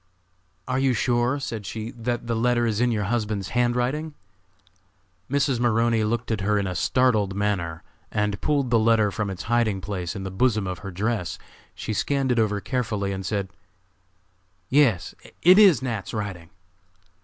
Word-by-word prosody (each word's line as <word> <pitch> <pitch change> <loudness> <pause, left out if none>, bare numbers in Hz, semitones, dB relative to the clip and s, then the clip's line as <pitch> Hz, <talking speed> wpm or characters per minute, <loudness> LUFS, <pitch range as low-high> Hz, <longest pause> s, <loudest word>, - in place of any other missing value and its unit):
"Are 130 0 0
you 135 -1 +2
sure," 120 +4 +1
said 115 -6 -5
she, 110 +3 -5
"that 120 -1 -3
the 115 0 -1
letter 120 +1 +2
is 110 -1 0
in 125 0 +3
your 105 -2 0
husband's 105 -3 -2
handwriting?" 125 +6 0 1.1
Mrs. 140 -2 +1
Maroney 115 -1 +2
looked 115 +2 -1
at 110 -3 -1
her 105 +2 +1
in 100 - 0
a 95 - -2
startled 105 0 +2
manner 95 -6 -2 0.3
and 105 -1 -1
pulled 140 -5 0
the 115 - +5
letter 110 -2 +3
from 105 0 -2
its 95 0 -6
hiding 115 -4 +1
place 95 -1 -4
in 95 - -5
the 95 - -5
bosom 110 +1 +1
of 90 -2 -4
her 100 - -7
dress. 95 -1 -2 0.4
She 110 - -4
scanned 135 +4 0
it 120 - +2
over 105 -2 +1
carefully 105 -4 -2
and 95 0 -4
said: 100 0 -2 1.2
"Yes, 130 -11 +3 0.3
it 185 +4 +8
is 185 - +6
Nat.'s 115 -5 -4
writing." 95 -6 -5
110 Hz, 165 wpm, -24 LUFS, 100-125 Hz, 1.2 s, it